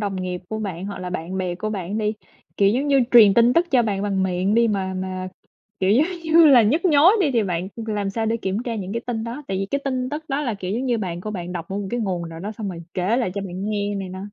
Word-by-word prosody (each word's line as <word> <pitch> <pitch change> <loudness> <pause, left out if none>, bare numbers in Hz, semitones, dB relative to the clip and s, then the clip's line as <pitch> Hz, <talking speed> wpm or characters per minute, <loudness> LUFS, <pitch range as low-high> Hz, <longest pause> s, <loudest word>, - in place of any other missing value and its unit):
đồng 200 -2 -2
nghiệp 180 0 -4
của 220 - -3
bạn 190 -3 -4
hoặc 200 - -6
là 180 0 -5
bạn 180 +2 -4
bè 180 -1 -2
của 215 +4 -4
bạn 200 +1 -3
đi, 210 0 0 0.4
kiểu 200 -1 +4
giống 260 +7 +1
như, 275 -1 +4
truyền 215 -5 +8
tin 235 +1 +5
tức 340 +3 +2
cho 250 -3 +4
bạn 200 -3 -1
bằng 195 -2 0
miệng 190 +2 0
đi 235 0 +4
mà 190 -2 -1
mà, 185 0 -4 0.5
kiểu 190 +1 +2
giống 275 +9 +4 0.2
như 325 0 +6
là, 255 -5 +7
nhức 300 - +1
nhối 325 +3 +6
đi 300 -6 +2
thì 230 -3 +2
bạn 180 -1 -2 0.2
làm 205 -2 -2
sao 225 +2 -2
để 225 +1 +1
kiểm 200 +1 -2
tra 235 -2 -3
những 195 -2 -5
cái 230 - -2
tin 225 -2 -2
đó? 240 +6 -6
Tại 190 - -1
vì 195 - -2
cái 280 - +1
tin 255 -2 -1
tức 305 +2 -5
đó 275 +2 -1
là, 240 -7 -2
kiểu 185 -2 -5
giống 245 +5 -2
như, 240 -2 +1
bạn 175 -4 -4
của 215 - -5
bạn 180 -3 -5
đọc 170 -2 -5
ở 195 - -4
một 200 - -4
cái 240 - -1
nguồn 180 -5 -2
nào 165 0 -9
đó 210 +3 -5
xong 210 -2 -5
rồi 170 -2 -6
kể 190 +6 +1
lại 235 -8 0
cho 200 - -2
bạn 195 +2 -4
nghe 205 -1 -1
này 195 -2 -4
nọ. 185 +1 -7
205 Hz, 295 wpm, -22 LUFS, 185-235 Hz, 0.5 s, truyền